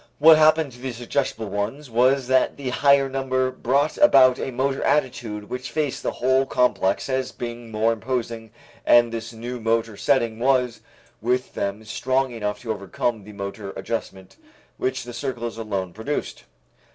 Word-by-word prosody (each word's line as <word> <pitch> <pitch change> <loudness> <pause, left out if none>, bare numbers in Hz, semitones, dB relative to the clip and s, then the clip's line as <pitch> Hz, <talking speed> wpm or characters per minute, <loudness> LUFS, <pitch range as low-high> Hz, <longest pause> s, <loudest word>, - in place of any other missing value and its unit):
What 160 +2 +8
happened 155 -2 +4
to 125 - -14
the 130 -1 -4
suggestible 120 -1 -2
ones 105 +9 -3
was 130 +3 +3
that 130 +1 +2
the 135 -2 -4
higher 140 +1 +4
number 130 -1 -1
brought 140 +4 0
about 130 - +6
a - - -3
motor 135 +2 -1
attitude 120 -7 -1
which 125 +2 -5
faced 145 +2 -2
that - - -2
whole 130 +2 +2
complex 125 -7 +1
as 130 -1 -1
being 120 -1 -7
more 110 +1 +1
imposing 115 -1 -4 0.3
and 120 -1 +5
this 115 0 -5
new 120 +2 -6
motor 115 -1 0
setting 115 -3 +1
was 125 -1 +1 0.4
with 125 +3 -1
them 100 +2 -3
strong 130 +3 0
enough 105 -3 -4
to 115 - -3
overcome 105 +2 -2
the 105 - -11
motor 100 0 -6
adjustment 95 -5 -5 0.4
which 130 0 -2
the 120 0 -9
circles 120 -4 -4
alone 100 -5 -3
produced. 140 +9 -4
125 Hz, 160 wpm, -23 LUFS, 115-130 Hz, 0.4 s, What